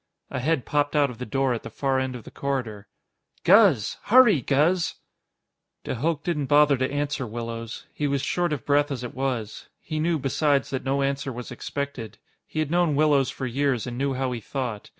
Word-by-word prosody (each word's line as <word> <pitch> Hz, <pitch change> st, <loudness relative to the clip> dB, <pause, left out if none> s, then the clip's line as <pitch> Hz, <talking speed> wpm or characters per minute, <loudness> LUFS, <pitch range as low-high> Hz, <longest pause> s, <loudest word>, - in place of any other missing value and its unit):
A -, -, -2 dB
head 140 Hz, 0 st, 0 dB
popped 145 Hz, 0 st, 0 dB
out 145 Hz, -3 st, +3 dB
of 120 Hz, -, -12 dB
the 125 Hz, -, -5 dB
door 135 Hz, +3 st, +1 dB
at 115 Hz, -, -3 dB
the -, -, -8 dB
far 135 Hz, -1 st, 0 dB
end 130 Hz, -1 st, -2 dB
of 120 Hz, -, -8 dB
the -, -, -12 dB
corridor. 125 Hz, -7 st, -3 dB, 0.6 s
"Guz! 185 Hz, -, +5 dB
Hurry, 215 Hz, -, +6 dB
Guz!" 155 Hz, +8 st, +2 dB, 0.9 s
De -, -, -3 dB
Hooch 155 Hz, +5 st, -1 dB
didn't 150 Hz, -6 st, -1 dB
bother 145 Hz, 0 st, +5 dB
to 130 Hz, 0 st, -1 dB
answer 145 Hz, -2 st, -2 dB
Willows. 115 Hz, 0 st, -6 dB
He 145 Hz, -, -1 dB
was 140 Hz, -1 st, -1 dB
short 175 Hz, -2 st, 0 dB
of 140 Hz, -6 st, -3 dB
breath 145 Hz, +1 st, +3 dB
as 130 Hz, -3 st, -4 dB
it 125 Hz, -, -6 dB
was. 125 Hz, -5 st, -3 dB
He 155 Hz, -2 st, -4 dB
knew, 165 Hz, +1 st, +1 dB
besides, 140 Hz, 0 st, +1 dB
that 130 Hz, -, -3 dB
no 135 Hz, +1 st, 0 dB
answer 135 Hz, 0 st, -1 dB
was 125 Hz, 0 st, -7 dB
expected. 130 Hz, -2 st, -5 dB, 0.3 s
He -, -, -10 dB
had 155 Hz, -1 st, 0 dB
known 175 Hz, -4 st, +2 dB
Willows 145 Hz, -3 st, +3 dB
for 130 Hz, -, -5 dB
years, 130 Hz, -1 st, 0 dB
and 125 Hz, -1 st, -5 dB
knew 135 Hz, +1 st, -1 dB
how 130 Hz, 0 st, -1 dB
he 120 Hz, -2 st, -4 dB
thought. 120 Hz, -3 st, -4 dB
135 Hz, 205 wpm, -25 LUFS, 125-150 Hz, 0.9 s, Hurry